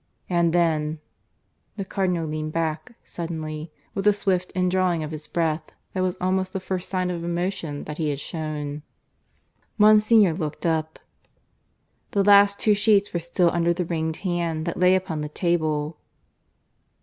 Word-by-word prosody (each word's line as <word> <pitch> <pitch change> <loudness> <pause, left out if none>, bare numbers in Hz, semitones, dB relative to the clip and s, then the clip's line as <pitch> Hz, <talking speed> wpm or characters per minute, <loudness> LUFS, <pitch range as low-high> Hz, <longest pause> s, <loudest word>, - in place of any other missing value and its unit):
And 170 -2 +2
then 160 -3 +1 0.8
The 195 - -3
Cardinal 180 -4 -1
leaned 155 0 -4
back 165 +7 -2
suddenly, 155 -2 -5 0.2
with 195 +1 -1
a 210 - +7
swift 185 -3 0
indrawing 180 -2 +1
of 155 - -5
his 155 -1 -7
breath 160 -2 -1 0.2
that 185 - -1
was 185 -1 0
almost 185 +1 0
the 190 - -2
first 185 -1 -4
sign 185 -1 -1
of 170 -1 -4
emotion 170 -3 -2
that 150 +1 -7
he 155 -2 0
had 140 -2 -2
shown. 150 -2 -4 1.0
Monsignor 215 -2 +6
looked 155 -2 -4
up. 160 -1 0 1.2
The 200 - +5
last 200 0 +6
two 215 - +4
sheets 205 -1 +3
were 170 - 0
still 170 +1 +1
under 170 0 +1
the 180 0 -2
ringed 160 -1 -2
hand 170 -3 -1
that 170 - -3
lay 180 +1 +5
upon 180 -5 -2
the 150 - -4
table. 155 -2 -1
170 Hz, 155 wpm, -24 LUFS, 155-185 Hz, 1.2 s, a